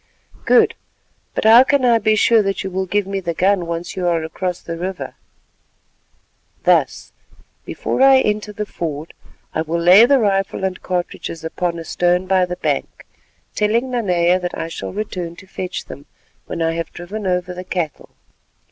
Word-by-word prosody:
"Good, -, -, +5 dB, 0.6 s
but -, -, -1 dB
how 225 Hz, +3 st, +8 dB
can 275 Hz, -1 st, +2 dB
I 235 Hz, -2 st, +4 dB
be 215 Hz, 0 st, +2 dB
sure 225 Hz, +1 st, +4 dB
that 195 Hz, -1 st, -2 dB
you 190 Hz, -, -5 dB
will 190 Hz, +1 st, -2 dB
give 205 Hz, +1 st, 0 dB
me 195 Hz, 0 st, -3 dB
the 170 Hz, -3 st, -4 dB
gun 185 Hz, -1 st, +2 dB
once 170 Hz, +1 st, -4 dB
you 180 Hz, -2 st, -1 dB
are 165 Hz, -2 st, +1 dB
across 180 Hz, +2 st, -3 dB
the 170 Hz, -, -6 dB
river?" 180 Hz, +2 st, -5 dB, 1.5 s
"Thus: -, -, +1 dB, 0.5 s
before -, -, -3 dB
I 270 Hz, 0 st, +7 dB
enter 210 Hz, -1 st, -1 dB
the 210 Hz, 0 st, -4 dB
ford 160 Hz, -5 st, -5 dB, 0.4 s
I -, -, 0 dB
will 165 Hz, +1 st, -2 dB
lay 185 Hz, +7 st, +7 dB
the 280 Hz, +1 st, +5 dB
rifle 195 Hz, -4 st, 0 dB
and 190 Hz, -1 st, -2 dB
cartridges 175 Hz, -2 st, -4 dB
upon 170 Hz, +1 st, -2 dB
a 165 Hz, -, -7 dB
stone 180 Hz, +2 st, +1 dB
by 185 Hz, -1 st, +2 dB
the 180 Hz, -, -4 dB
bank, -, -, -3 dB, 0.5 s
telling 230 Hz, +5 st, 0 dB
Nanea 180 Hz, -6 st, +2 dB
that 180 Hz, -1 st, -4 dB
I 165 Hz, -, -4 dB
shall 165 Hz, -, -6 dB
return 185 Hz, -4 st, -5 dB
to 190 Hz, -, -14 dB
fetch 185 Hz, -1 st, -5 dB
them 140 Hz, -, -11 dB, 0.4 s
when 165 Hz, -, -3 dB
I 165 Hz, 0 st, +1 dB
have 165 Hz, 0 st, -4 dB
driven 195 Hz, +4 st, -6 dB
over 180 Hz, 0 st, -1 dB
the 180 Hz, +1 st, -7 dB
cattle." 175 Hz, -4 st, -4 dB
185 Hz, 175 wpm, -19 LUFS, 170-210 Hz, 1.5 s, how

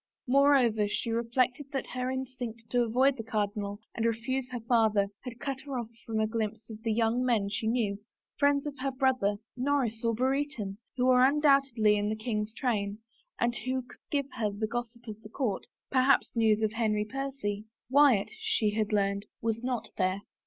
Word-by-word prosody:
Moreover 255 Hz, -5 st, +4 dB
she 225 Hz, +2 st, -2 dB
reflected 245 Hz, +4 st, 0 dB
that 270 Hz, -, -1 dB
her 255 Hz, 0 st, -1 dB
instinct 255 Hz, -3 st, -5 dB
to 245 Hz, -, +3 dB
avoid 255 Hz, +4 st, +3 dB
the 225 Hz, -, -4 dB
cardinal 205 Hz, -2 st, -2 dB
and 225 Hz, -, -2 dB
refuse 235 Hz, +3 st, -1 dB
her 250 Hz, -1 st, -4 dB
father 220 Hz, -4 st, +3 dB
had 245 Hz, -2 st, -9 dB
cut 270 Hz, 0 st, -3 dB
her 275 Hz, -2 st, -5 dB
off 235 Hz, -2 st, -4 dB, 0.2 s
from 220 Hz, -1 st, -1 dB
a 220 Hz, -, +3 dB
glimpse 220 Hz, 0 st, -3 dB
of 215 Hz, 0 st, -9 dB
the 225 Hz, -1 st, -1 dB
young 230 Hz, +2 st, +2 dB
men 225 Hz, -5 st, +2 dB
she 210 Hz, +2 st, -2 dB
knew, 220 Hz, -4 st, 0 dB, 0.4 s
friends 285 Hz, 0 st, +2 dB
of 295 Hz, -, -3 dB
her 275 Hz, +1 st, 0 dB
brother, 255 Hz, -6 st, +1 dB, 0.2 s
Norris 250 Hz, -4 st, 0 dB
or 230 Hz, -1 st, +1 dB
Brereton, 260 Hz, -5 st, -1 dB, 0.2 s
who 250 Hz, -, +2 dB
were 255 Hz, 0 st, +6 dB
undoubtedly 275 Hz, -6 st, +4 dB
in 205 Hz, 0 st, 0 dB
the 215 Hz, -, -1 dB
king's 215 Hz, -1 st, -2 dB
train, 210 Hz, -5 st, -1 dB, 0.4 s
and 235 Hz, 0 st, +2 dB
who 255 Hz, +2 st, -2 dB
could 245 Hz, -, -16 dB
give 280 Hz, -2 st, 0 dB
her 215 Hz, -2 st, +1 dB
the 205 Hz, +2 st, -2 dB
gossip 240 Hz, +1 st, -5 dB
of 215 Hz, 0 st, -7 dB
the 210 Hz, -, -11 dB
court 230 Hz, -4 st, -2 dB
— -, -, -59 dB
perhaps 260 Hz, 0 st, +3 dB
news 220 Hz, -1 st, +3 dB
of 215 Hz, -, +2 dB
Henry 215 Hz, -2 st, +1 dB
Percy. 255 Hz, -5 st, -4 dB, 0.3 s
Wyatt, 270 Hz, -7 st, +5 dB
she 215 Hz, -2 st, +1 dB
had 215 Hz, 0 st, -1 dB
learned, 200 Hz, 0 st, 0 dB
was 225 Hz, +1 st, -2 dB
not 250 Hz, -3 st, -2 dB
there. 185 Hz, +1 st, +1 dB
230 Hz, 190 wpm, -30 LUFS, 215-260 Hz, 0.4 s, were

